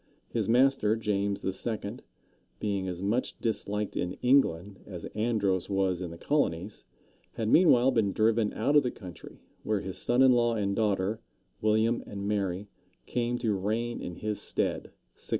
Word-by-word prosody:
His - - -2
master, 125 -3 +4
James 100 -2 -1
II., 105 +3 -3 0.6
being 100 -3 -1
as 90 0 -5
much 115 +6 -1
disliked 105 -2 -2
in 90 +1 -2
England 100 -8 +2
as 90 -4 -7
Andros 105 -5 0
was 95 -2 0
in 90 - -4
the 85 - -9
colonies, 100 - -1 0.5
had 110 - -3
meanwhile 135 -7 +6
been 110 -5 +1
driven 110 +1 +2
out 145 - +1
of 145 - +8
the 125 - -1
country, 90 -7 -11 0.2
where 105 -2 -1
his 95 -1 -5
son 125 +2 +3
in 130 - +7
law 120 -1 +3
and 100 -2 -1
daughter, 105 0 0 0.4
William 110 +2 +2
and 100 0 -5
Mary, 100 -1 -1 0.4
came 120 0 -1
to 115 -3 0
reign 110 +5 -2
in 90 - -6
his 105 +2 -3
stead - - -1 0.3
(1688). - - -8
105 Hz, 160 wpm, -29 LUFS, 95-120 Hz, 0.6 s, of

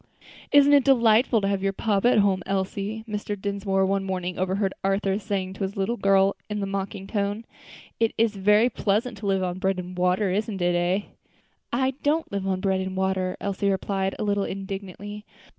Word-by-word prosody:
"Isn't 285 0 +6
it 285 -2 +6
delightful 235 -3 +4
to 195 - 0
have 200 -1 0
your 195 0 0
papa 210 +2 +1
at - - +3
home, 200 -2 +3
Elsie?" 195 +3 -2
Mr. 210 -1 -4
Dinsmore 195 -1 0
one 195 0 0
morning 185 -2 -3
overheard 190 +1 0
Arthur 195 0 +1
saying 195 -3 -3
to 195 - -11
his 195 +1 -4
little 195 +5 0
girl 195 -2 +3
in 210 0 -2
a - - 0
mocking 195 0 -4
tone. 205 +2 -2 0.5
"It's 225 -1 +1
very 210 +4 +4
pleasant 220 0 -1
to 205 - -4
live 195 -1 +1
on 180 0 -3
bread 190 -1 0
and 180 0 -6
water, 180 +2 +1
isn't 205 +1 -2
it, 175 0 +2
eh?" 175 +3 +1 0.7
"I 260 +2 +1
don't 310 +3 0
live 200 -1 -2
on 185 -1 -1
bread 190 -1 +1
and 190 0 -4
water," 190 -1 0
Elsie 200 0 -1
replied, 195 0 -1
a - - -3
little 205 -1 +1
indignantly. 195 +1 -6
195 Hz, 190 wpm, -25 LUFS, 190-210 Hz, 0.7 s, Isn't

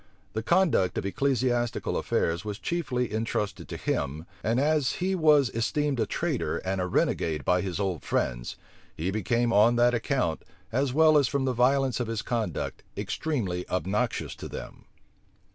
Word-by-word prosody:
The 110 - -1
conduct 160 - +2
of - - -2
ecclesiastical 120 +1 0
affairs 85 +3 0
was 105 -1 -4
chiefly 125 -9 -2
intrusted 110 -2 -2
to - - -5
him; 75 +3 -2 0.2
and 115 +3 +1
as 150 -1 +2
he 185 +2 -1
was 150 -7 +4
esteemed 140 +4 0
a 110 - +1
traitor - - -1
and 95 0 -2
a 90 - -1
renegade 80 -5 0
by 90 0 +3
his 95 -1 -3
old 95 -5 -1
friends, - - -2 0.4
he 85 +4 -1
became 115 +3 +1
on 110 +4 +5
that 120 +1 +4
account, 120 - 0 0.3
as 135 +2 +1
well 155 +2 +6
as 140 - +2
from 135 +1 0
the 130 - +1
violence 130 0 +2
of 120 - -1
his 115 0 -3
conduct, 110 -9 -2 0.2
extremely 100 - -2
obnoxious 105 +6 -1
to - - -7
them. - - -9
120 Hz, 160 wpm, -27 LUFS, 95-135 Hz, 0.4 s, well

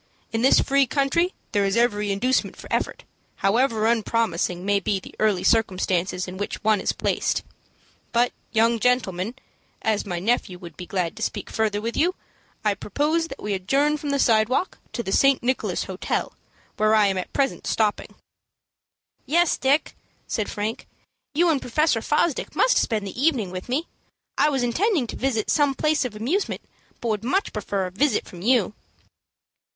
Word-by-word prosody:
In 225 - -1
this 265 - +6
free 275 -1 +3
country 300 +7 +1 0.2
there 205 -2 +2
is 195 +2 +1
every 210 -4 +2
inducement 250 +7 0
for - - -11
effort, - - -1 0.4
however 225 +1 +2
unpromising 215 -6 0
may 200 0 +3
be 195 +1 -1
the - - -13
early 210 -4 +2
circumstances 185 -4 +1
in 180 +1 -7
which 205 - -4
one 215 -2 +3
is - - +1
placed. - - -1 0.7
But, 240 +1 +2 0.2
young 230 +1 +3
gentlemen, 220 -3 0 0.5
as 215 -2 0
my 175 -2 -2
nephew 195 -1 0
would 175 -1 -11
be 180 - -8
glad 180 -4 -2
to - - -8
speak - - -3
further 215 -2 0
with 230 +2 -4
you, 360 +4 +2 0.5
I 210 - +3
propose 300 - -1
that - - -10
we 210 - -1
adjourn 275 +11 +1
from 290 -1 -5
the 280 - +1
sidewalk 230 +6 +2
to 235 - -3
the 195 - -4
St. 275 +3 +4
Nicholas 255 +2 0
Hotel, - - -3 0.4
where 215 0 +4
I 215 -1 +5
am 195 -2 +1
at 180 - -6
present 275 -1 -1
stopping." 215 -2 0 1.1
"Yes, 345 +3 +3
Dick," 275 +4 +1 0.3
said 215 - -2
Frank, 215 +2 -4 0.5
"you 345 +3 +4
and 295 -4 +1
Professor 255 -1 +1
Fosdick 300 +3 0
must - - +4
spend 215 -4 0
the 200 +6 -6
evening 260 - +2
with 185 +5 -7
me. 285 +7 0 0.5
I 300 - +3
was 270 -4 0
intending 320 - +1
to - - -7
visit 245 -5 0
some 285 -2 +3
place 305 +1 +1
of 230 -4 -5
amusement, 285 - -1 0.4
but 235 - -2
would 215 0 -1
much 375 - 0
prefer 200 -2 -2
a 180 - -5
visit 275 +10 +1
from 175 - -11
you." 220 -2 +2
230 Hz, 175 wpm, -24 LUFS, 200-275 Hz, 1.1 s, this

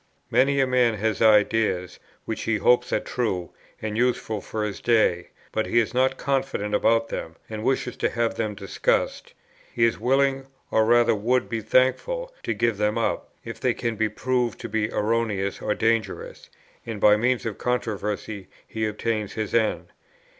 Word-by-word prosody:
Many 140 +2 +3
a 135 - +4
man 125 -3 +2
has 110 0 -1
ideas, 105 -4 +3 0.3
which 110 - -4
he 110 -1 +1
hopes 125 +3 +3
are - - +2
true, 95 -8 -2 0.3
and 105 -1 -4
useful 115 -3 0
for 110 +3 -4
his 105 -2 -4
day, 110 -7 +2 0.2
but 110 - -1
he - - 0
is 115 0 +2
not 130 +1 +2
confident 135 -7 -1
about 115 +2 +2
them, 80 - -5
and 110 -1 -6
wishes 130 -1 0
to - - +1
have 115 -1 0
them 110 -2 -3
discussed, 100 -1 -1 0.4
He 115 - +2
is 115 - 0
willing, 135 +1 +1 0.2
or 110 - +3
rather 120 +1 +4
would 120 +4 +1
be 115 -1 -3
thankful, - - +1
to - - -2
give 115 -3 +1
them 105 0 +1
up, - - -1 0.2
if - - -7
they - - +1
can 115 -1 -2
be 110 0 0
proved 125 +1 -1
to - - -6
be 110 -1 0
erroneous 105 -3 -1
or 105 - 0
dangerous, 115 0 -1 0.3
and 115 -3 -6
by 105 +1 +6
means 125 +3 0
of 110 -3 -4
controversy 105 -4 -3 0.2
he 110 -2 -2
obtains 105 -1 -2
his 110 -2 -4
end. 115 -2 +1
115 Hz, 175 wpm, -24 LUFS, 105-125 Hz, 0.4 s, by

